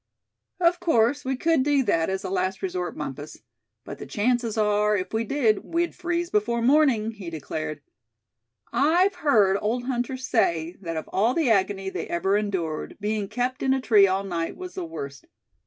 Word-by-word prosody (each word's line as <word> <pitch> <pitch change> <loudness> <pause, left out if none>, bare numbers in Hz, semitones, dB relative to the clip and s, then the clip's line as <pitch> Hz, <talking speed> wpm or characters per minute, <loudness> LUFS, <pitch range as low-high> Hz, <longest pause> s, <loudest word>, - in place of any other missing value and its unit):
"Of 350 0 +3
course 290 -5 +2
we 265 +1 -1
could 325 +1 +2
do 280 0 +2
that, 165 -7 +1
as 190 +1 -2
a 190 - -4
last 185 - -1
resort, 365 -1 -3
Bumpus; - - -7 0.4
but - - -8
the - - -8
chances 235 0 0
are, 210 0 +2
if 185 - -5
we 220 +1 +1
did, 225 -4 +1
we'd 340 +1 -1
freeze 345 0 -2
before 230 +3 +1
morning!" 255 -5 +3
he 200 -6 -8
declared. 155 -1 -5 0.9
"I've 330 +10 +3
heard 215 - +3
old 235 +4 -1
hunters 255 +1 -3
say 170 -6 +1
that 165 -3 -4
of 160 - -5
all 225 +6 +1
the 310 -8 +2
agony 195 -1 +1
they - - -4
ever 190 +3 0
endured, 190 -7 -2
being 210 -1 -2
kept 250 +4 -2
in 265 0 +2
a - - 0
tree 215 -6 +5
all 190 +1 0
night 170 -4 -3
was 365 0 -8
the 370 -2 -4
worst. 140 - -8
220 Hz, 180 wpm, -25 LUFS, 195-275 Hz, 0.9 s, tree